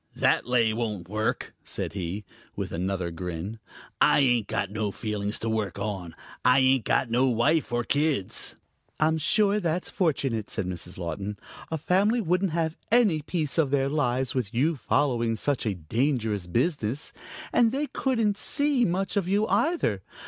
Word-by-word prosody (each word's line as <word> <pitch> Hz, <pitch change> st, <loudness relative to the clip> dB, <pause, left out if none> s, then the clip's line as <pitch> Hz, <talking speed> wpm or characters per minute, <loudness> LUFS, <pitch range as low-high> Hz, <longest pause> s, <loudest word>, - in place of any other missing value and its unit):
"That -, -, +2 dB
lay 120 Hz, -3 st, +3 dB
won't 105 Hz, -6 st, -3 dB
work," 110 Hz, +2 st, -2 dB
said -, -, -4 dB
he, 100 Hz, +2 st, -4 dB, 0.3 s
with -, -, -4 dB
another 90 Hz, 0 st, -2 dB
grin. 90 Hz, +5 st, -5 dB, 0.4 s
"I -, -, +6 dB
ain't 120 Hz, -5 st, +3 dB
got 100 Hz, -, -2 dB
no 105 Hz, 0 st, -1 dB
feelings 105 Hz, 0 st, -3 dB
to 115 Hz, -, -4 dB
work 110 Hz, -5 st, -1 dB
on. 100 Hz, -5 st, -4 dB, 0.3 s
I 125 Hz, +1 st, +5 dB
ain't 130 Hz, -3 st, +4 dB
got 120 Hz, -, +1 dB
no 125 Hz, +3 st, +3 dB
wife 130 Hz, +5 st, +2 dB
or 120 Hz, 0 st, 0 dB
kids." 145 Hz, -7 st, 0 dB, 0.4 s
"I'm 160 Hz, +1 st, +2 dB
sure 205 Hz, +6 st, +3 dB
that's 175 Hz, -1 st, -2 dB
fortunate," 135 Hz, -, 0 dB
said 110 Hz, -, -2 dB
Mrs. 90 Hz, 0 st, -5 dB
Laughton. 95 Hz, +4 st, -4 dB, 0.3 s
"A 160 Hz, -, -1 dB
family 195 Hz, +9 st, +2 dB
wouldn't 185 Hz, -1 st, +1 dB
have 165 Hz, -1 st, -1 dB
any 215 Hz, -10 st, +4 dB
peace 155 Hz, 0 st, -1 dB
of 150 Hz, -4 st, +3 dB
their 135 Hz, 0 st, +1 dB
lives 130 Hz, -3 st, 0 dB
with 125 Hz, -6 st, -2 dB
you 155 Hz, +7 st, +2 dB
following 120 Hz, -3 st, +1 dB
such 135 Hz, +1 st, -1 dB
a 100 Hz, -, 0 dB
dangerous 110 Hz, -, -1 dB
business. 125 Hz, -, -1 dB, 0.4 s
And 230 Hz, -2 st, +4 dB
they 280 Hz, +4 st, -1 dB
couldn't 230 Hz, -8 st, 0 dB
see 285 Hz, -1 st, +2 dB
much 190 Hz, 0 st, 0 dB
of 195 Hz, -3 st, +1 dB
you 205 Hz, +3 st, +2 dB
either. 315 Hz, -, +1 dB
125 Hz, 165 wpm, -27 LUFS, 105-165 Hz, 0.4 s, I